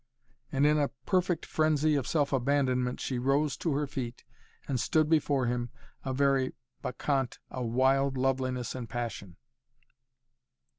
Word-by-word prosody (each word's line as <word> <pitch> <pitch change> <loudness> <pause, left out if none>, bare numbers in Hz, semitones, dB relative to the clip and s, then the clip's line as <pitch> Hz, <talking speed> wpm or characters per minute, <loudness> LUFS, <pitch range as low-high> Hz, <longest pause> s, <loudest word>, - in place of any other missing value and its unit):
and 140 +1 +2
in 150 0 +4
a 145 - +2 0.2
perfect 180 -3 +1
frenzy 155 -1 +2
of 140 -4 0
self 145 -3 +1
abandonment 130 -2 +1
she 130 -2 -2
rose 140 +3 +1
to 165 - -1
her 145 +1 +1
feet 125 -4 -5 0.4
and 130 -3 -1
stood 155 +5 +2
before 145 -4 +2
him, 120 0 -1 0.3
a 135 - -2
very 135 -1 +2 0.3
bacchante 135 0 -1
of 125 -2 -3
wild 135 +3 +2
loveliness 130 -2 0
and 125 -3 -6
passion. 115 -6 -5
135 Hz, 140 wpm, -30 LUFS, 125-145 Hz, 0.4 s, in